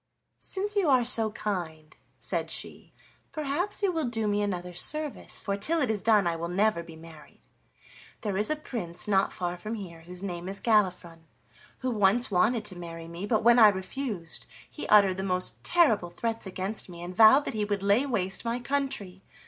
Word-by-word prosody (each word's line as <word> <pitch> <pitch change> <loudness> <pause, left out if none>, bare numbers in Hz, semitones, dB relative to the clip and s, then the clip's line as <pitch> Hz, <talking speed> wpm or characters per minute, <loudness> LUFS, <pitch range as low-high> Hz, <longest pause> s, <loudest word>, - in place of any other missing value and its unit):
"Since 410 +2 -2
you 390 -7 +2
are 255 -3 +4
so 225 -2 +5
kind," 170 -8 -5 0.2
said - - -2
she, - - -4 0.4
"perhaps 310 +8 -1
you 390 - +3
will 325 -4 -1
do 225 -3 -2
me 205 0 +1
another 180 -3 -3
service, 300 - +1
for 200 - -2
till 315 +12 0
it 260 -7 +1
is 210 -2 -2
done 215 -4 +3
I 170 -1 0
will 165 +1 -4
never 195 +1 +1
be 165 -1 -12
married. 160 -1 -15 0.8
There 205 -3 -3
is 210 +2 +1
a 305 - +1
prince 200 - -5
not 195 -1 +2
far 175 -1 -4
from 215 +5 -5
here 175 -6 -9
whose 180 +3 -9
name 175 -1 -5
is 195 - -5
Galifron, 180 -7 0 0.6
who 255 -1 -1
once 215 +3 +2
wanted 215 +4 +2
to 190 - -4
marry 165 -1 -8
me, 170 +4 -6
but 220 0 +1
when 235 +1 +6
I 220 - +9
refused 195 -2 -3 0.2
he 300 - -8
uttered 200 -3 +5
the - - -2
most 185 -1 -2
terrible 230 - +3
threats 225 +4 -3
against 190 +2 -3
me, 170 -1 -9
and 180 +1 -7
vowed 230 +7 +7
that - - -3
he 215 -1 -1
would 205 -1 -2
lay 200 +6 +3
waste 195 -7 -2
my 235 +1 -2
country. 250 -8 -3
205 Hz, 195 wpm, -27 LUFS, 180-235 Hz, 0.8 s, I